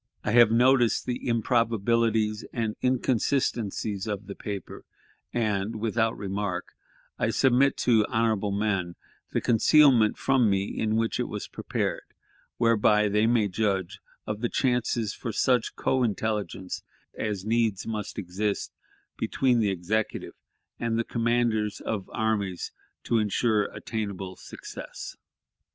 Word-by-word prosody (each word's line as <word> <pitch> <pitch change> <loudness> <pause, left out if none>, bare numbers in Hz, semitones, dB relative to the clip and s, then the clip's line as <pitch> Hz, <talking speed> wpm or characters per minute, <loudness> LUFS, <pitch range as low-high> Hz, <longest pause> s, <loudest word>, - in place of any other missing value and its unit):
I - - -1
have 120 -1 +7
noticed 120 +1 +3
the 125 0 -3
improbabilities 115 -2 +1
and 110 -3 -2
inconsistencies 120 -5 0
of 105 -1 -3
the 100 - -6
paper, 100 -2 -7 0.5
and, 105 -2 -1
without 110 +1 0
remark, 100 -2 -3 0.5
I - - +1
submit 130 +1 +3
to 110 -4 +4
honorable 110 -3 +1
men 100 -4 -1 0.4
the - - 0
concealment 125 -1 +5
from 130 -5 +3
me 95 -1 +2
in 110 0 0
which 115 0 0
it - - 0
was - - -5
prepared, - - -4 0.4
whereby 105 -2 +3
they 105 +2 +2
may 115 -3 +3
judge 95 -2 -1 0.3
of 105 0 -4
the 120 - 0
chances 120 -4 0
for 115 - -5
such 125 +2 +1
co 130 - +1
intelligence 105 -4 -2 0.3
as 105 -3 -3
needs 110 -3 +1
must 110 -2 -4
exist 100 +3 -2 0.5
between 125 -3 +2
the 105 -3 +2
Executive 100 +4 -2 0.5
and 115 -1 0
the 115 - +1
commanders 115 -2 0
of 100 -4 -4
armies 105 -5 -1 0.3
to 115 - +1
insure 105 0 +1
attainable 100 -4 -5
success. - - -9
110 Hz, 125 wpm, -27 LUFS, 105-115 Hz, 0.5 s, have